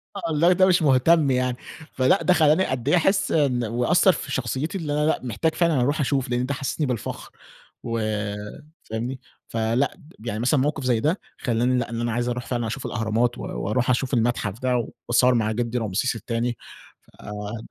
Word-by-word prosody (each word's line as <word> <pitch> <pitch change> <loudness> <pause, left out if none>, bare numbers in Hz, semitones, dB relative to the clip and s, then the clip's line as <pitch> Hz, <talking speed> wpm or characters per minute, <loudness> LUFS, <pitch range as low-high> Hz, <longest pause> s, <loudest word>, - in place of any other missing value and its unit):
آه، 200 - -5
والله 165 +3 +3
ده 185 +1 +4
مش 185 -2 +3
مهتم 145 +1 +4
يعني. 125 -1 0 0.4
فلأ، 130 +9 +3
ده 180 - +4
خلاني 160 +2 +4
قد 130 +1 -2
أحس 190 +3 +2
إن 135 -6 +2
وأثر 125 - +3
في - - -6
شخصيتي 130 - -2
اللي 155 -5 -3
أنا 150 0 +1
لأ، 160 - +1
محتاج 145 +7 -1
فعلًا 165 -7 +2
أروح 145 +5 +1
أشوف، 135 -2 0
لأن 125 +1 0
ده 140 - -2
حسسني 140 +3 -2
بالفخر 125 -3 -4 0.5
و 115 -1 -2 0.8
فاهمني؟ 120 +4 -4 0.3
فلأ، 115 +4 0 0.2
يعني 110 -1 -4
مثلًا 130 +4 +2
موقف 145 +1 -1
زي 125 -3 +2
ده، 155 - 0 0.2
خلاني 125 +1 +1
لأ، 120 - -3
إن 115 0 -3
أنا 120 - -1
عايز 120 +2 -1
أروح 120 0 -3
فعلًا 120 -2 -2
أشوف 125 +4 -5
الأهرامات 115 +1 0
و - - -7
وأروح 105 - -2
أشوف 130 +2 0
المتحف 115 -3 0
ده، 125 -3 0 0.2
وأتصور 125 +1 +4
مع 110 -2 +1
جدي 120 +2 -2
رمسيس 115 +2 -1
التاني. 115 +2 -2 0.6
فده 105 +2 -7
125 Hz, 185 wpm, -24 LUFS, 115-145 Hz, 0.8 s, ده